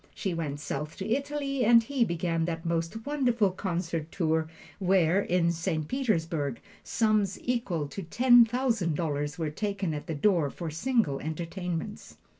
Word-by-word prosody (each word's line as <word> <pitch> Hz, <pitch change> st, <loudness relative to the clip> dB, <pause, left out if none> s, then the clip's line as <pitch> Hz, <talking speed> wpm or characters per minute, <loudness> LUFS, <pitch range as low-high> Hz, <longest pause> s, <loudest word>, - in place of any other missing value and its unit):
She 190 Hz, -, -2 dB
went 150 Hz, -4 st, -3 dB
south 150 Hz, +1 st, -4 dB
to 190 Hz, -, -4 dB
Italy, 275 Hz, +2 st, -1 dB
and 230 Hz, 0 st, +6 dB
he 265 Hz, +1 st, +1 dB
began 170 Hz, -4 st, 0 dB
that 165 Hz, -1 st, -4 dB
most 170 Hz, +6 st, -2 dB
wonderful 245 Hz, -8 st, +2 dB
concert 170 Hz, -4 st, -3 dB
tour, 160 Hz, -2 st, 0 dB, 0.3 s
where, 185 Hz, -1 st, +3 dB
in 175 Hz, -3 st, +2 dB
Saint 160 Hz, -2 st, -2 dB
Petersburg, 165 Hz, -, -1 dB, 0.2 s
sums 215 Hz, -4 st, +1 dB
equal 230 Hz, -12 st, -1 dB
to 195 Hz, -, -6 dB
ten 240 Hz, +7 st, +6 dB
thousand 230 Hz, -, 0 dB
dollars 145 Hz, -1 st, -2 dB
were 160 Hz, -3 st, -2 dB
taken 200 Hz, -1 st, -2 dB
at 150 Hz, +2 st, -6 dB
the 165 Hz, -, -3 dB
door 165 Hz, -2 st, +2 dB
for 165 Hz, +2 st, -6 dB
single 210 Hz, -, +1 dB
entertainments. 170 Hz, +5 st, -5 dB
175 Hz, 150 wpm, -28 LUFS, 160-225 Hz, 0.3 s, and